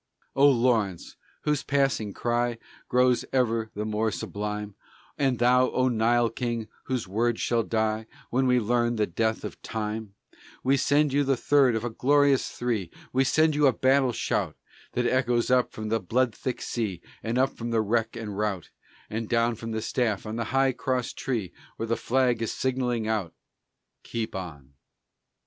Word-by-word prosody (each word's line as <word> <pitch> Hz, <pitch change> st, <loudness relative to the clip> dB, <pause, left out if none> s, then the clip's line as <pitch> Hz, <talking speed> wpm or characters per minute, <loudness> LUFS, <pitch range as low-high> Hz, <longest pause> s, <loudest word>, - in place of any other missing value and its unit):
O 140 Hz, +1 st, +6 dB
Lawrence, 115 Hz, -8 st, +1 dB, 0.3 s
whose 150 Hz, -2 st, +1 dB
passing 135 Hz, -7 st, 0 dB
cry 120 Hz, +2 st, -1 dB, 0.3 s
Grows 125 Hz, 0 st, +3 dB
ever 115 Hz, -4 st, +1 dB
the 105 Hz, +1 st, -3 dB
more 110 Hz, +1 st, 0 dB
sublime, 105 Hz, 0 st, -4 dB, 0.4 s
And 135 Hz, -3 st, +1 dB
thou, 125 Hz, +2 st, +4 dB
O 130 Hz, 0 st, +1 dB
Nile 120 Hz, 0 st, +2 dB
King, 115 Hz, -2 st, -3 dB, 0.2 s
whose 125 Hz, -6 st, -2 dB
words 115 Hz, +4 st, 0 dB
shall 120 Hz, -1 st, +1 dB
die 110 Hz, 0 st, -1 dB, 0.2 s
When 130 Hz, +2 st, +2 dB
we 125 Hz, 0 st, +4 dB
learn 120 Hz, +1 st, +1 dB
of -, -, -4 dB
the 105 Hz, -, +2 dB
death 110 Hz, +5 st, -1 dB
of -, -, -7 dB
time, 110 Hz, -1 st, -4 dB, 0.5 s
We 135 Hz, +2 st, +4 dB
send 145 Hz, +1 st, +2 dB
you 145 Hz, +1 st, +3 dB
the 135 Hz, -1 st, +1 dB
third 135 Hz, -2 st, +4 dB
of 110 Hz, -, -2 dB
a 120 Hz, -, -2 dB
glorious 140 Hz, +2 st, +3 dB
three; 115 Hz, -8 st, -2 dB, 0.2 s
We 130 Hz, +1 st, +4 dB
send 155 Hz, +3 st, +3 dB
you 145 Hz, -1 st, +4 dB
a 130 Hz, -, +4 dB
battle 130 Hz, -1 st, +3 dB
shout -, -, -1 dB, 0.4 s
That 125 Hz, -, 0 dB
echoes 120 Hz, -1 st, +1 dB
up 125 Hz, -1 st, +3 dB
from 110 Hz, 0 st, -5 dB
the 115 Hz, +1 st, +1 dB
blood 120 Hz, +5 st, +1 dB
thick 130 Hz, -, -4 dB
sea 105 Hz, -7 st, -2 dB, 0.2 s
And 115 Hz, +2 st, -2 dB
up 135 Hz, +1 st, +2 dB
from 120 Hz, 0 st, -5 dB
the 115 Hz, -1 st, +2 dB
wreck 115 Hz, +2 st, 0 dB
and 110 Hz, -3 st, -5 dB
rout 100 Hz, -4 st, -2 dB, 0.4 s
And 110 Hz, 0 st, -4 dB
down 115 Hz, 0 st, +2 dB
from 115 Hz, 0 st, -7 dB
the 110 Hz, -1 st, -3 dB
staff 115 Hz, -5 st, -1 dB
on 110 Hz, +1 st, -4 dB
the 115 Hz, 0 st, -2 dB
high 135 Hz, +3 st, +2 dB
cross 125 Hz, -1 st, -2 dB
tree 110 Hz, -9 st, -3 dB, 0.2 s
Where 115 Hz, -, -2 dB
the 115 Hz, +1 st, 0 dB
flag 125 Hz, -2 st, +1 dB
is 115 Hz, -, -1 dB
signalling 125 Hz, -4 st, -1 dB
out: 105 Hz, -7 st, -2 dB, 0.7 s
"Keep 115 Hz, -1 st, -4 dB
on." 75 Hz, -8 st, -7 dB
120 Hz, 175 wpm, -27 LUFS, 110-130 Hz, 0.7 s, O